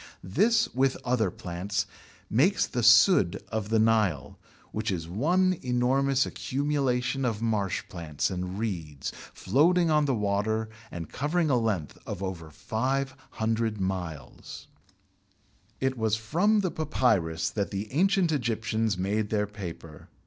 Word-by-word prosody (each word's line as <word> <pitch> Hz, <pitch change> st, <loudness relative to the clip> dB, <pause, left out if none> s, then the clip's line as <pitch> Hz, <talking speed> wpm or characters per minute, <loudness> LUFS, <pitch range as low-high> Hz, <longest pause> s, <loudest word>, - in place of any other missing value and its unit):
This, 225 Hz, -, +3 dB
with 130 Hz, +1 st, +2 dB
other 120 Hz, -5 st, +2 dB
plants, 95 Hz, +3 st, -3 dB, 0.4 s
makes 165 Hz, -, +3 dB
the 120 Hz, -, -3 dB
"sudd" 120 Hz, -, +6 dB
of 110 Hz, -2 st, -3 dB
the 115 Hz, -, +2 dB
Nile, 110 Hz, -10 st, +1 dB, 0.3 s
which -, -, -2 dB
is 85 Hz, -3 st, -3 dB
one 175 Hz, -, +1 dB
enormous 130 Hz, +2 st, +2 dB
accumulation 135 Hz, -2 st, -1 dB
of 115 Hz, -4 st, 0 dB
marsh 105 Hz, -5 st, -1 dB
plants 80 Hz, -4 st, -3 dB
and 90 Hz, +1 st, -4 dB
reeds 80 Hz, -, -4 dB, 0.2 s
floating 165 Hz, -, +3 dB
on 150 Hz, -1 st, +3 dB
the 135 Hz, -3 st, +1 dB
water 105 Hz, +1 st, 0 dB, 0.2 s
and 85 Hz, -2 st, -6 dB
covering 155 Hz, +2 st, 0 dB
a -, -, +4 dB
length 105 Hz, -9 st, -2 dB
of 95 Hz, -, -5 dB
over 85 Hz, -4 st, -5 dB
500 115 Hz, -, -2 dB
miles. 90 Hz, -7 st, -5 dB, 1.1 s
It 130 Hz, 0 st, 0 dB
was 110 Hz, -1 st, +2 dB
from 175 Hz, -, +2 dB
the 185 Hz, -3 st, -1 dB
Papyrus 90 Hz, -, 0 dB
that 100 Hz, -2 st, -2 dB
the 100 Hz, +1 st, -5 dB
ancient 185 Hz, +1 st, +3 dB
Egyptians 115 Hz, -5 st, 0 dB
made 105 Hz, +3 st, -1 dB
their 105 Hz, -1 st, +1 dB
paper. 85 Hz, -7 st, -9 dB
110 Hz, 130 wpm, -28 LUFS, 95-135 Hz, 1.1 s, sudd